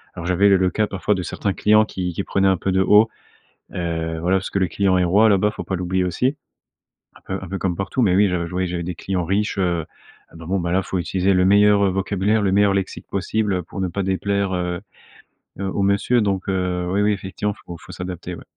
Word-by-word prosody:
alors, 85 - -6
j'avais 90 +3 +3
le 95 - +5
le 95 -1 +2
cas 110 -1 0
parfois 100 +2 -1
de 95 - -3
certains 100 +2 -2
clients 110 +2 +4
qui 90 -4 -4
qui 95 - -3
prenaient 95 0 +1
un 95 -2 +3
peu 95 - -2
de 95 +1 +2
haut, 105 +4 +5 0.6
heu, 80 -2 -3
voilà, 90 +3 +2
parce 95 - -4
que 100 - -1
le 95 - +2
client 95 +2 +1
est 90 - +2
roi 105 +5 +4
là-bas, 105 +1 +3
faut - - -7
pas 95 - -3
l'oublier 90 +1 -1
aussi. 125 - 0 0.8
Un - - -16
peu 95 - -3
un - - -9
peu 95 +1 -4
comme 90 -3 -1
partout, 100 +7 -1
mais 95 -5 +3
oui, 100 +1 +4
je 90 -2 -1
je - - -9
voyais 90 +1 -1
j'avais 85 -1 -3
des 85 0 -5
clients 95 -3 -2
riches, 100 +3 -1
heu, 85 -3 0 0.5
ah - - -20
bah, 80 0 -10
bon, 95 +2 0
ben, 85 0 -2
là 95 +1 +2
faut 95 - -3
utiliser 95 +3 0
le 90 0 +3
meilleur, 100 0 +5
heu, 95 - +2
vocabulaire, 100 +3 0
le 100 - +2
meilleur 100 0 +3
lexique 95 -1 -3
possible, 105 +1 -1
heu, 90 - -1
pour 95 - -8
ne 95 - 0
pas 100 +3 -3
déplaire, 100 +1 -1
heu 90 0 -2 0.8
heu, 100 - -2
au 95 +1 -2
monsieur 100 +5 +2
donc 100 -2 -1
heu, 90 -1 -1
oui, 100 +2 +1
oui 105 +1 +3
effectivement 100 +1 -4
faut 85 - -8
faut - - -13
s'adapter, 90 -1 -6
ouais. - - -11
95 Hz, 250 wpm, -21 LUFS, 90-100 Hz, 0.8 s, le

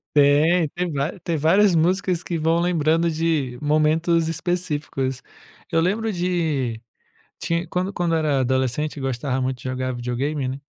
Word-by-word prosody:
Tem, 150 +4 +4
tem 175 +1 -3
vária 145 +7 -2
tem 165 -2 -1
várias 185 +5 +4
músicas 180 +1 +1
que 170 - -3
vão 165 +2 +2
lembrando 165 -1 +2
de 155 -6 -1
momentos 160 +2 +2
específicos. 150 -6 -2 0.5
Eu 165 - +3
lembro 215 +6 0
de 160 - -1 0.6
tinh 170 +1 -1
quando 185 +2 -1
quando 175 -3 0
eu - - +2
era 150 -3 +1
adolescente 130 +4 0
eu 140 - -6
gostava 130 0 -1
muito 130 0 -2
de - - -14
jogar 130 0 -2
videogame 130 +3 -2
né, 135 +2 -5
155 Hz, 155 wpm, -22 LUFS, 135-175 Hz, 0.6 s, Tem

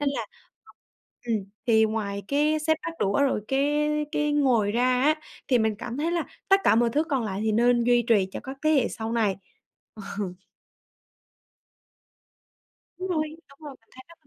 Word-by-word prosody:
nên 290 - +1
là - - -4 1.0
ừm, 230 -2 +1 0.3
thì 220 -1 +5
ngoài 205 -2 -2
cái 300 +2 +2
xếp 315 +1 +2
bát 335 - -3
đũa 200 +6 +1
rồi 270 -6 +1
cái 295 +2 +1 0.2
cái 295 0 0
ngồi 245 -8 +2
ra 245 +2 +1 0.2
á 305 +2 +4 0.3
thì 250 -3 +4
mình 220 -1 +1
cảm 240 +1 -6
thấy 330 +3 0
là 335 -3 0 0.2
tất 390 0 +5
cả - - +5
mọi 235 0 +3
thứ 300 +6 +1
còn 270 -7 -1
lại 195 -1 -3
thì 220 - +1
nên 240 +1 +3
duy 240 0 +4
trì 200 -4 +3
cho - - -5
các 265 +1 -7
thế 310 - +4
hệ 270 - +3
sau 225 0 -5
này. 215 -5 +1 0.8
Ờ. 205 - 0 2.7
Đúng 375 +1 -4
rồi, 310 -2 -2
đúng 275 - -20
rồi, 290 -3 -9
mình 225 - -36
thấy 260 - -13
nó 335 - -15
v - - -33
255 Hz, 190 wpm, -26 LUFS, 220-295 Hz, 2.7 s, thì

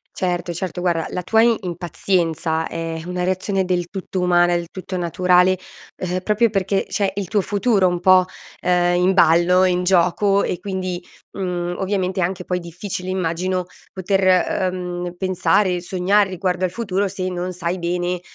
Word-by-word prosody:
Certo, 175 -1 -2
certo, 180 0 -4
guarda, 170 -3 0
la 180 - -3
tua 220 +5 +3 0.2
impazienza 170 -2 -1
è 165 -1 -4
una 180 0 -3
reazione 190 +1 0
del 180 -1 0
tutto 190 0 -5
umana, 175 -1 +3
del 170 0 -2
tutto 185 0 -6
naturale, 180 +1 +3 0.4
ehm, 180 0 -2
proprio 215 +3 +2
perché 195 -1 0
c'è 195 -1 0
il 200 -2 -3
tuo 210 - +2
futuro 200 -1 +2
un 175 -1 -1
po', 185 0 +6 0.3
ehm, 175 0 +2
in 185 +2 +3
ballo, 180 +1 +4
in 180 -1 +2
gioco 190 +2 +3
e 175 - -2
quindi, 185 -3 -4 0.4
mhmm, 180 -2 -2
ovviamente 190 -1 -1
è - - +2
anche 180 +1 -2
poi 180 0 -2
difficile, 180 +2 -6
immagino, 185 0 -1 0.3
poter, 190 +1 0
ehm, 180 -1 0
pensare, 185 0 +1
sognare 190 +3 +1
riguardo 185 0 -1
al 180 - -3
futuro 200 -2 -1
se 185 -1 -4
non 180 0 -4
sai 180 +1 -3
bene, 175 +1 -1
180 Hz, 160 wpm, -21 LUFS, 175-190 Hz, 0.4 s, po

